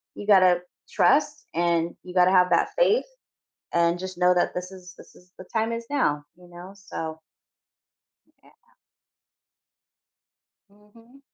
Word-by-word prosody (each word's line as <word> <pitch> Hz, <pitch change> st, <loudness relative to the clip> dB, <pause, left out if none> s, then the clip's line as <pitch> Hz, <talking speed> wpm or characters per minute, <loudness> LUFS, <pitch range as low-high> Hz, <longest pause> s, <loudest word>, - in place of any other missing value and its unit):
you 205 Hz, -, -9 dB
gotta 185 Hz, -3 st, +5 dB, 0.3 s
trust -, -, +1 dB
and 170 Hz, 0 st, 0 dB
you 180 Hz, -, -10 dB
gotta 180 Hz, 0 st, +4 dB
have 180 Hz, -1 st, +4 dB
that 170 Hz, -, +1 dB
faith -, -, +3 dB, 0.7 s
and 170 Hz, 0 st, +2 dB
just 185 Hz, -1 st, -7 dB
know 180 Hz, 0 st, +4 dB
that 175 Hz, -, +1 dB
this 180 Hz, +1 st, -6 dB
is 180 Hz, -1 st, -12 dB
this -, -, -16 dB
is 180 Hz, +1 st, -22 dB
the 185 Hz, -, -10 dB
time 225 Hz, 0 st, -1 dB
is 230 Hz, 0 st, -5 dB
now, 150 Hz, -, 0 dB
you 180 Hz, 0 st, -18 dB
know, 175 Hz, +2 st, -12 dB
so 160 Hz, -5 st, -7 dB, 1.3 s
Yeah. -, -, -21 dB, 2.2 s
Mhm. 230 Hz, +6 st, -22 dB
180 Hz, 140 wpm, -24 LUFS, 175-205 Hz, 2.2 s, gotta